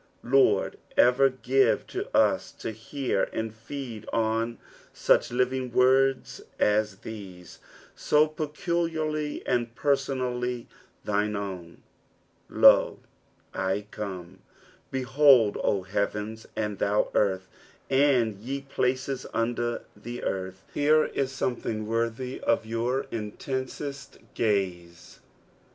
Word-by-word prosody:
Liord, 135 +2 +3 0.2
erer 125 +2 +5
give 130 +1 +2 0.3
us - - +2
to - - -5
hear 115 0 -2
and 110 -1 -3
feed 115 -1 -7
on 115 +1 0 0.3
such - - +3
living 125 0 0
words 130 +2 +3 0.2
as 105 -1 +2
these, 95 -5 -9 0.4
so 150 +1 +3
peculiarly 155 0 -2
and 120 -1 -1
pentonall; 125 -3 -1 0.4
thine 105 0 0
own. 95 -4 -6 0.7
"£0, - - +6 0.4
/ 100 +3 -4
come." 95 -3 -7 0.5
Behold, 130 -4 +4
O 95 -2 +1
heavens, 105 +3 -3
and 105 -2 -2
thou 105 +1 +1
earth, 95 -2 +1 0.4
and 130 -7 +3
;e 135 +3 -3
places 130 -1 -2
under 120 +1 -1
the 120 +4 -7
earth! 95 0 -4
Here 155 +2 +4
is 135 -1 -2
someCbing 115 -4 -2
northj 115 +3 -2
of 115 - +1
jour 120 +4 -1
intensest 130 +5 -5 0.2
gaze. 90 -6 -2
120 Hz, 100 wpm, -27 LUFS, 105-135 Hz, 0.7 s, £0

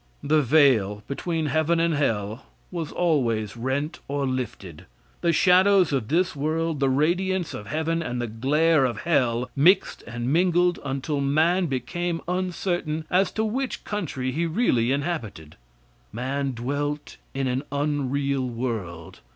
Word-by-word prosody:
The 155 +1 +3
veil 120 -8 +3
between 160 +3 -2
heaven 160 +3 +1
and 165 0 +2
earth 110 -6 -1 0.3
was 165 -4 -4
always 120 - 0
rent 130 +6 -2
or 140 0 -1
lifted. 120 - -5 0.3
The 170 - +3
shadows 185 +1 +4
of 130 -6 -1
this 170 +3 +1
world, 155 +1 -1
the 135 -1 +2
radiance 175 +6 +1
of 105 - -7
heaven, 160 +2 -1
and 125 -6 -3
the 120 - -1
glare 140 +7 +2
of 125 -2 -1
hell 125 -7 +1
mixed 170 +8 +3
and 120 +3 -2
mingled 175 0 +3
until 140 +1 -2
man 160 +6 +2
became 165 +5 -2
uncertain 175 -3 -2
as 185 +2 +3
to 220 - 0
which 255 +4 -3
country 140 - -3
he 165 +5 -1
really 145 - +1
inhabited. 140 - -3 0.6
Man 135 +4 -2
dwelt 145 +5 -3 0.2
in 135 0 -1
an 130 +1 0
unreal 140 -2 -1
world. 110 -9 -5
145 Hz, 140 wpm, -25 LUFS, 125-170 Hz, 0.6 s, shadows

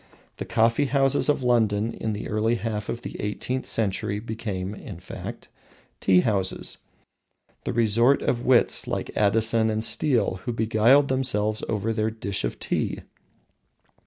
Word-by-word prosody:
The - - -5
coffee 115 +5 +2
houses 135 +1 +2
of 145 -3 +1
London 110 -3 +2
in 110 - -3
the 105 - -5
early 110 +2 +1
half 110 -3 -4
of 120 - -4
the - - -6
eighteenth 125 +5 -3
century 105 -1 -1
became, 105 -4 -4
in 100 -4 -9
fact, 90 - -8 0.5
tea 90 -1 +4
houses, 95 -4 -1 0.9
the - - -1
resort 115 +4 +3
of 120 -1 0
wits 125 -2 +3
like - - -4
Addison 110 +2 +2
and 110 0 -1
Steele, 115 -4 +1
who 120 - -2
beguiled 115 +5 +4
themselves 110 -5 0
over 110 +1 -1
their 110 0 0
"dish 105 -3 -4
of - - -2
tea." - - -2
110 Hz, 145 wpm, -25 LUFS, 105-120 Hz, 0.9 s, tea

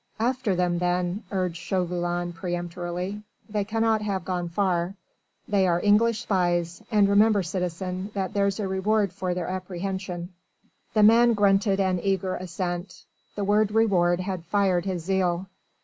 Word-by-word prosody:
"After 245 -3 0
them 175 -1 +1
then!" 180 +2 0
urged 185 -3 -1
Chauvelin 175 -1 -2
peremptorily. 175 +3 -4 0.3
"They 210 -2 -1
cannot 225 +1 +1
have 195 -4 -2
gone 175 -1 -2
far. 180 0 0 0.5
They 195 -3 +2
are 170 -1 +2
English 215 +3 +3
spies, 175 -5 0
and 205 -2 +4
remember, 205 0 +4
citizen, 180 +2 -3
that 190 -1 -2
there's 200 0 +1
a 205 - -1
reward 195 +1 +1
for 180 -1 -2
their 180 -2 -3
apprehension." 185 -1 -4 0.7
The 215 - +5
man 230 +2 +6
grunted 200 -1 +3
an 185 -2 +1
eager 190 -1 0
assent. 180 0 -5 0.3
The 205 - -2
word 210 +1 +2
"reward" 185 -6 +3
had 185 -2 -4
fired 185 -1 +1
his 185 -4 -3
zeal. 185 -1 0
190 Hz, 145 wpm, -26 LUFS, 175-205 Hz, 0.7 s, man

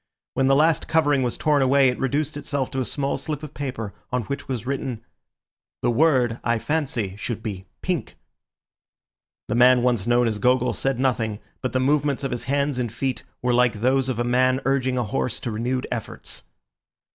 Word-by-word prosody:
When 135 - +2
the 135 - +5
last 155 +2 +3
covering 145 -4 +3
was 125 -2 -1
torn 150 -2 +2
away 135 +1 +5
it 125 - -3
reduced 145 +3 0
itself 140 -2 -2
to 135 - -2
a - - -1
small 140 +4 -1
slip 155 -1 -5
of 150 - -8
paper, 125 -6 -4 0.2
on 125 -1 0
which 140 +6 -5
was 125 -4 -3
written:— 130 -4 -3 0.8
"The 120 - +3
word, 125 -3 +3
I 120 0 +2
fancy, 125 -8 -1
should 110 0 -4
be 95 -3 -5 0.2
'pink'." 175 -10 -2 1.3
The - - -1
man 125 +1 +6
once 120 -4 +1
known 120 0 +4
as 110 -2 -2
Gogol 125 +2 +3
said 135 -2 -1
nothing, 115 -5 0 0.2
but 130 - -2
the 130 - +2
movements 140 +1 +1
of 135 - -2
his 120 - -3
hands 140 -1 0
and 120 -3 -1
feet 130 +3 -2 0.2
were 125 0 +2
like 125 0 +4
those 130 +1 +2
of 130 - -1
a 120 - +1
man 130 +2 +3
urging 130 -1 +1
a 125 - +1
horse 115 +2 -2
to 120 - -3
renewed 125 +4 -1
efforts. 115 -3 -6
130 Hz, 190 wpm, -24 LUFS, 120-140 Hz, 1.3 s, man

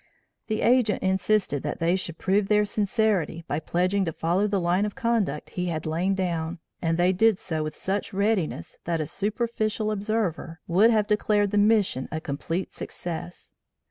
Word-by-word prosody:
The 215 -1 -1
Agent 240 -3 +3
insisted 190 -5 +1
that 150 - -3
they 170 +2 +2
should 170 -3 -4
prove 195 +1 +1
their 210 0 +3
sincerity 205 -5 0
by 145 - -1
pledging 185 +5 0
to 165 - -1
follow 175 +6 0
the 200 -1 0
line 175 +3 +1
of 210 -1 -3
conduct 220 -11 -1
he 180 0 -2
had 160 -3 -3
lain 175 +5 0
down, 170 -2 -2 0.2
and 165 -1 0
they 180 +2 +3
did 220 +2 +4
so 160 -4 -3
with 155 -1 -4
such 195 +1 -2
readiness 195 - -1
that 165 -1 0
a 155 - -1
superficial 215 - -1
observer 200 -6 -2
would 195 +6 +4
have 215 -3 +3
declared 210 -1 +1
the 205 - +3
mission 205 - +2
a 160 - -2
complete 165 +5 -3
success. 175 0 -6
190 Hz, 175 wpm, -26 LUFS, 165-210 Hz, 0.2 s, did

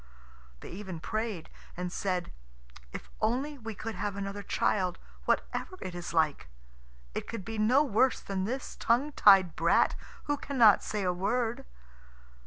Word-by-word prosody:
They - - -9
even 185 -2 -6
prayed, 215 -1 -3 0.3
and 180 0 -3
said, 180 -2 -2 0.6
"If - - -9
only 265 +6 0
we 225 -2 -6
could 225 +3 -5
have 200 +1 -3
another 200 0 -4
child, 185 -2 0 0.3
whatever 370 - -1
it 185 - -6
is 175 0 -6
like, 155 - +1 0.6
it - - -4
could 230 -5 -6
be 225 -1 -4
no 250 +7 +5
worse 260 0 +2
than 190 -1 -3
this 255 +5 -4
tongue 255 +6 +1
tied 195 - +6
brat - - +3 0.3
who 290 0 -1
cannot 240 -8 +5
say 210 -2 -3
a 180 -1 +1
word." 225 +6 -1
210 Hz, 150 wpm, -30 LUFS, 185-235 Hz, 0.6 s, tied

